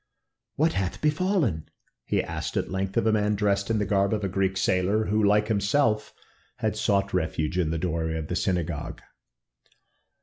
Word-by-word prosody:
"What 160 +3 +2
hath 95 -2 -2
befallen?" 150 - 0 0.4
he - - 0
asked - - -4
at - - -2
length 95 0 -2
of - - +2
a 110 - +4
man 105 -1 +1
dressed 100 0 0
in 115 - +2
the 105 - 0
garb 100 +1 +2
of 105 - -4
a - - +1
Greek 95 0 0
sailor, 95 +3 +1
who, 105 +1 +1
like 105 +1 +3
himself, 110 +2 +1 0.5
had - - -1
sought 100 0 +1
refuge 80 -1 -1
in 85 -4 +1
the 80 - -1
doorway 80 -1 -1
of 80 -1 -4
the 90 - -3
synagogue. 85 -4 -2
100 Hz, 175 wpm, -26 LUFS, 90-105 Hz, 0.5 s, a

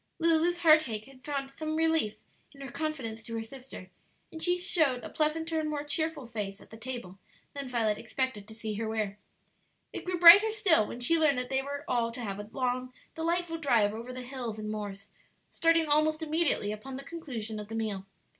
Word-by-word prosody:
Lulu's 335 +1 +3
heartache 310 -10 +4
had 265 -1 -17
found 275 -2 -3
some 310 +2 -4
relief 320 -9 +2 0.4
in 275 - -13
her 270 -2 -7
confidence 265 -9 -4
to 230 0 -7
her 225 - -2
sister, 250 -6 -10 0.4
and 320 - -8
she 355 +1 +3
showed 315 -8 +1
a - - -7
pleasanter 320 +1 +1
and 310 -1 -2
more 295 -1 -2
cheerful 315 -1 -1
face 210 -4 -5
at - - -18
the - - -9
table 225 -5 -7 0.3
than 280 -2 -5
Violet 220 -4 0
expected 235 -3 -3
to 220 - -11
see 220 -1 -4
her 220 +1 -3
wear. 210 -2 -2 0.7
It - - -5
grew 365 -1 -2
brighter 355 +6 +10
still 400 - +3
when 245 - -7
she 330 +7 +3
learned 300 -4 +3
that 250 0 -3
they 265 0 +2
were 285 +1 -6
all 235 -2 +1
to 250 - -6
have 200 -3 -4
a 205 0 -8
long, 255 -1 -2 0.2
delightful 335 0 -1
drive 230 -9 +3
over 230 +3 -7
the 255 0 -6
hills 245 -4 -5
and 215 0 -4
moors, 205 -2 -6 0.4
starting 330 0 +3
almost 310 +2 +2
immediately 310 -9 +1
upon 260 +5 -7
the 275 - -8
conclusion 240 -10 -6
of 210 - -7
the 225 - -6
meal. 205 -4 -3
260 Hz, 200 wpm, -30 LUFS, 220-315 Hz, 0.7 s, brighter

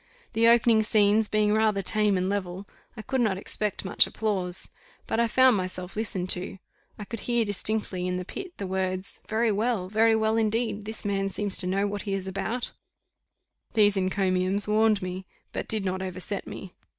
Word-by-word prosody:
The 230 +1 +4
opening 230 -1 +5
scenes 215 0 +3
being 210 0 +2
rather 215 -2 +2
tame 210 0 +1
and 185 0 0
level, 190 -1 -3 0.3
I 215 - -6
could 260 +1 -1
not 210 -5 +1
expect 205 +1 -2
much 190 - +4
applause; 190 -5 0 0.3
but 225 - -1
I 235 - +3
found 255 +1 +5
myself 185 -1 -4
listened 200 -4 -1
to: 185 +2 -4 0.4
I 210 - -6
could 230 +2 -5
hear 240 0 +1
distinctly 205 -2 -1
in 180 0 -1
the 180 - -4
pit, 360 - -8
the 200 - -4
words 185 0 -2
'Very 220 +1 +2
well 210 -3 0
very 220 +2 +4
well 220 0 +1
indeed! 220 -1 0
this 220 0 -6
man 195 -1 0
seems 200 0 -2
to 180 - -2
know 195 +2 +1
what 205 0 -3
he 200 -2 -2
is 190 -1 -4
about.' 220 +6 -3 1.0
These 205 -2 +5
encomiums 190 +1 +1
warmed 215 -1 +3
me, 185 +1 -5 0.3
but - - -4
did 215 -3 +1
not 185 0 -2
overset 190 +1 -4
me. 185 - -8
205 Hz, 185 wpm, -27 LUFS, 190-220 Hz, 1.0 s, opening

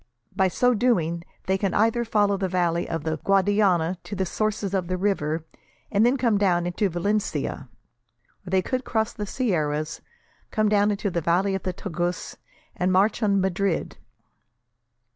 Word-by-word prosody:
By 190 -1 +3
so 245 +7 +2
doing, 175 -8 +1 0.2
they 190 +1 +1
can 195 -2 -1
either 225 +3 +2
follow 205 -3 +2
the 195 -1 -1
valley 175 -1 0
of 165 -2 -3
the 160 0 -1
Guadiana 195 -3 +2
to 205 - -6
the 190 -1 -1
sources 210 0 -2
of 185 -3 0
the 185 +1 -1
river, 165 -5 -1 0.5
and 205 +1 +3
then 245 +3 +3
come 230 -5 +2
down 175 -4 +2
into 180 +3 0
Valencia; 175 - -2 0.8
or - - -5
they 190 0 +2
could 255 +4 -2
cross 220 -3 -1
the 210 -1 -5
sierras, 155 - -1 0.5
come 215 -1 +1
down 205 0 +3
into 205 -1 -1
the 170 - -1
valley 180 +5 +1
of 190 - -2
the 185 - -3
Tagus, 175 -1 -3 0.4
and 180 +1 0
march 200 +5 +3
on 200 -2 +3
Madrid. 190 0 -1
190 Hz, 165 wpm, -25 LUFS, 175-210 Hz, 0.8 s, By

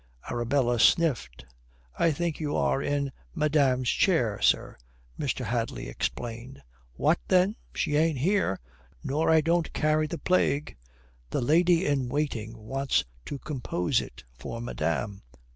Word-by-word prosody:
Arabella 120 0 +1
sniffed. 120 - +2 0.5
"I 165 - +2
think 165 +1 -2
you 150 -2 -2
are 135 - +1
in 140 -1 -1 0.2
madame's 140 -5 +2
chair, 120 - +2
sir," - - +2 0.4
Mr. - - -2
Hadley - - -2
explained. 120 - -5 0.3
"What, 60 - +2
then? 185 +3 +3 0.2
She 150 -3 0
ain't 160 -1 +2
here, 175 - +1 0.4
nor 150 +4 0
I 160 -1 +6
don't 170 +1 +1
carry 155 0 +2
the 170 - -4
plague." 155 -5 +1 0.5
"The - - -1
lady 170 +6 +3
in 135 -4 0
waiting 120 -6 -2
wants 135 +5 0 0.2
to 145 - -5
compose 125 - -1
it 60 +1 -11
for 65 - -7
madame." 100 -2 -2
140 Hz, 130 wpm, -27 LUFS, 120-160 Hz, 0.5 s, I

